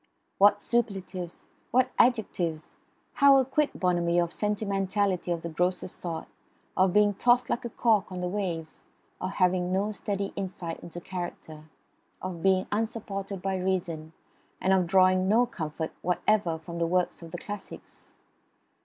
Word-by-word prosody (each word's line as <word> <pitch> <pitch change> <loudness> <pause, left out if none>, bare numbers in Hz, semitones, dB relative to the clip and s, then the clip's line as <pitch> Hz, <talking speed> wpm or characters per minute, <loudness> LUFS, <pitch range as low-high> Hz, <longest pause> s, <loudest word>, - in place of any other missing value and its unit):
What 205 +1 +6
superlatives! 195 -7 -2 0.2
What 255 +1 +3
adjectives! 180 -10 +1 0.4
How 280 -1 +7
acquit 270 +3 +1
Bonamy 175 -2 +2
of 170 -1 +1
sentimentality 200 -3 0
of 170 -1 -2
the 170 - -3
grossest 180 +2 -1
sort; 165 -2 -4 0.5
of 185 -1 +4
being 210 +1 +4
tossed 240 +5 +3
like 240 - -1
a - - -2
cork 215 -4 +2
on 180 - -5
the 180 - -1
waves; 175 -5 -3 0.4
of 185 - -1
having 180 -1 +2
no 200 +3 +1
steady 200 -1 -3
insight 180 -4 -4
into 170 0 -8
character; 170 -4 -7 0.5
of 180 -3 -5
being 190 0 +3
unsupported 200 -3 -3
by 195 0 0
reason, 170 -4 -2 0.5
and 190 - +2
of 185 -2 +3
drawing 185 +1 +4
no 235 +4 +5
comfort 160 -7 -4
whatever 180 -1 +1
from 170 +1 -7
the 170 - +1
works 180 +1 0
of 165 - -9
the 175 - -6
classics? 205 +2 -9
185 Hz, 145 wpm, -28 LUFS, 175-205 Hz, 0.5 s, How